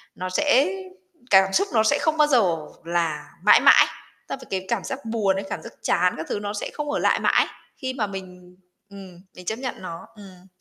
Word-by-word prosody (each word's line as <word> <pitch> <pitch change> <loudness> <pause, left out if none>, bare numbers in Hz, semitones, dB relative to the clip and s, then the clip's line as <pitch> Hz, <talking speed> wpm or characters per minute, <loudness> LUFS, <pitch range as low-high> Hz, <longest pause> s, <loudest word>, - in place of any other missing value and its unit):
nó 185 0 -5
sẽ 275 +4 +3 0.6
cảm 195 0 +5
xúc 395 +2 +2
nó 220 -1 +4
sẽ 285 +6 +2
không 315 -1 +1
bao 300 -1 +5
giờ 200 - +3 0.3
là 165 -3 -2
mãi 210 - +7
mãi. - - +7 0.4
Ta - - -3
và 260 - -13
cái 190 -1 -3
cảm 230 -5 -1
giác 270 - -5
buồn 215 -4 0
ấy, 195 0 -4
cảm - - -4
giác - - -10
chán 180 +1 +2
các 160 - -5
thứ - - -2
nó 205 0 -4
sẽ 205 - -4
không 295 -1 -4
ở - - -1
lại - - +2
mãi - - +3 0.3
khi 260 -2 -4
mà 220 -5 -2
mình 180 -2 -10 0.3
ừm, 190 -3 -12
mình 180 - -12
chấp 220 +5 -3
nhận 260 -1 -4
nó, 170 +2 -8
ừm. 190 -3 -15
195 Hz, 220 wpm, -23 LUFS, 180-245 Hz, 0.6 s, mãi